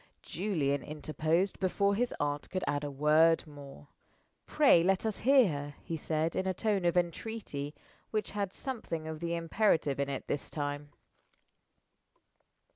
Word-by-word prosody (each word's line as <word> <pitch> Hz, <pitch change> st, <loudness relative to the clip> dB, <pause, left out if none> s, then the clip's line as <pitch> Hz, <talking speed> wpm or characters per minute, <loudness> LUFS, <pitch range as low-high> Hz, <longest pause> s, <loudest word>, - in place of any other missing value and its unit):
Julian 155 Hz, -7 st, -1 dB
interposed 155 Hz, +5 st, -1 dB
before 200 Hz, +1 st, +2 dB
his 240 Hz, +4 st, 0 dB
aunt 145 Hz, 0 st, -2 dB
could 185 Hz, 0 st, -3 dB
add 145 Hz, +1 st, -1 dB
a 145 Hz, -, -2 dB
word 155 Hz, +4 st, +4 dB
more. 145 Hz, -1 st, -12 dB, 0.6 s
"Pray 285 Hz, -, +5 dB
let 190 Hz, +4 st, +1 dB
us 220 Hz, -2 st, -1 dB
hear 265 Hz, -2 st, +5 dB
her," 145 Hz, -1 st, -5 dB
he 165 Hz, -, -4 dB
said, 160 Hz, +1 st, -1 dB
in 190 Hz, -, -1 dB
a 185 Hz, -, 0 dB
tone 205 Hz, -3 st, 0 dB
of 175 Hz, +1 st, +2 dB
entreaty 170 Hz, -5 st, -3 dB, 0.3 s
which 215 Hz, -1 st, -2 dB
had 200 Hz, -2 st, -2 dB
something 205 Hz, -, -5 dB
of 160 Hz, -1 st, -5 dB
the 170 Hz, 0 st, -2 dB
imperative 165 Hz, -4 st, +1 dB
in 140 Hz, 0 st, 0 dB
it 135 Hz, -2 st, -4 dB
this 145 Hz, -, -3 dB
time. 145 Hz, -1 st, -4 dB
165 Hz, 150 wpm, -31 LUFS, 145-195 Hz, 0.6 s, Pray